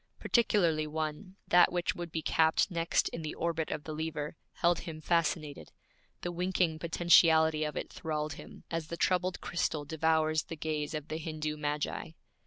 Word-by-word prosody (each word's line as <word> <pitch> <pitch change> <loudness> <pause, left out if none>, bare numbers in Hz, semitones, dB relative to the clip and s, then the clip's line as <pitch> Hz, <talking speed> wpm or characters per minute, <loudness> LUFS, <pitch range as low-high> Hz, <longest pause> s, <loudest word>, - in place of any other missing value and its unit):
Particularly 170 -10 +2
one, 155 +5 -4
that 175 0 +6
which 175 -1 0
would 175 -1 -6
be 160 -1 -3
capped 160 +6 +3
next 170 -1 +1
in 165 - -6
the 155 -1 -5
orbit 165 -1 -1
of 150 - -3
the 155 - -6
lever, 155 -1 -4 0.2
held 170 0 +2
him 160 -2 -7
fascinated; 155 -2 -1 0.5
the 175 - -3
winking 175 -2 0
potentiality 160 -2 +4
of 150 -1 -3
it - - -5
thralled 155 -1 -3
him, - - -12
as 165 -2 -2
the 170 - -5
troubled 185 0 +1
crystal 160 -4 -1
devours 160 0 +1
the 165 - -6
gaze 155 0 -2
of 150 0 -5
the 155 - -2
Hindu 155 -1 -3
magi. 150 +2 -3
160 Hz, 170 wpm, -31 LUFS, 155-170 Hz, 0.5 s, that